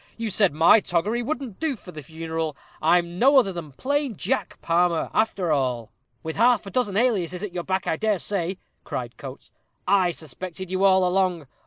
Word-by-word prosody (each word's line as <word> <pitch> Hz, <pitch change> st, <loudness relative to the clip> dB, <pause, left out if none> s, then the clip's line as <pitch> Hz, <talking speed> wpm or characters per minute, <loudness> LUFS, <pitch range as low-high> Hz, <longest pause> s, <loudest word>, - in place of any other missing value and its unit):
You 225 Hz, -2 st, -3 dB
said 195 Hz, -1 st, +3 dB
my 160 Hz, +8 st, +6 dB
toggery 205 Hz, +6 st, -1 dB
wouldn't 255 Hz, -5 st, -4 dB
do 315 Hz, -4 st, -1 dB
for 190 Hz, -5 st, -13 dB
the 155 Hz, -, -8 dB
funeral. 160 Hz, 0 st, -4 dB, 0.2 s
I'm 170 Hz, +2 st, +2 dB
no 275 Hz, +3 st, +6 dB
other 200 Hz, -8 st, +4 dB
than 165 Hz, -4 st, -7 dB
plain 280 Hz, -, -1 dB
Jack -, -, -2 dB
Palmer, 170 Hz, 0 st, +1 dB
after 195 Hz, -6 st, +1 dB
all." 125 Hz, -5 st, -1 dB, 0.3 s
"With 160 Hz, 0 st, -5 dB
half 235 Hz, 0 st, +4 dB
a 195 Hz, -, -8 dB
dozen 210 Hz, -6 st, 0 dB
aliases 195 Hz, -6 st, +1 dB
at 205 Hz, -4 st, -5 dB
your 175 Hz, -1 st, -3 dB
back, 190 Hz, 0 st, -1 dB
I 160 Hz, -, 0 dB
dare 215 Hz, 0 st, +1 dB
say," 185 Hz, -1 st, -2 dB, 0.3 s
cried -, -, -5 dB
Coates. -, -, -10 dB, 0.4 s
"I 190 Hz, -3 st, +4 dB
suspected 175 Hz, +4 st, -7 dB
you 190 Hz, +1 st, 0 dB
all 190 Hz, -1 st, +5 dB
along. 180 Hz, -3 st, 0 dB
185 Hz, 185 wpm, -24 LUFS, 165-215 Hz, 0.4 s, my